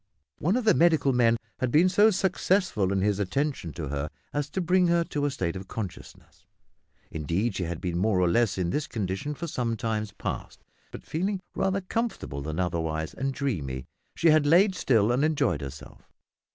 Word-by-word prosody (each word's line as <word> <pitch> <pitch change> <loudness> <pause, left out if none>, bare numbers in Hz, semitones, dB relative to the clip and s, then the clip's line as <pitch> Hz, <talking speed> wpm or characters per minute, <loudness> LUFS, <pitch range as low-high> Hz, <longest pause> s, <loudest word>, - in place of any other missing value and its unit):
One 180 +8 +1
of 250 - 0
the 215 - +6
medical 160 -5 +3
men 115 -2 +4 0.2
had 130 - 0
been 160 +8 +5
so 205 +4 +5
successful 185 - +1
in 95 -1 +1
his 100 0 +1
attention 105 - -1
to 75 -1 -5
her 70 +1 -3 0.2
as 145 0 -2
to 190 - -3
bring 180 +1 +3
her 170 0 +3
to 145 -3 -2
a - - +2
state 95 -10 -2
of 95 +1 -7
consciousness. 100 -4 -8 0.6
Indeed 85 +9 -1
she 95 -1 -2
had 85 -1 -4
been 90 -2 -2
more 100 -1 +2
or 90 - +3
less 115 +2 +2
in 90 -2 0
this 150 +7 -1
condition 105 +7 -3
for 170 - -5
some 120 -7 -2
time 110 -3 -2
past, - - -5 0.3
but - - -10
feeling 190 +5 -1
rather 195 +1 0
comfortable 190 - -3
than 80 +3 -4
otherwise, 80 -3 -2
and 135 0 -2
dreamy, 80 - -3 0.3
she 165 - +4
had 155 -1 +4
lain 185 +6 +5
still 115 - +2
and 125 +4 +2
enjoyed 145 - +1
herself. 70 -2 -9
120 Hz, 190 wpm, -27 LUFS, -, 0.6 s, the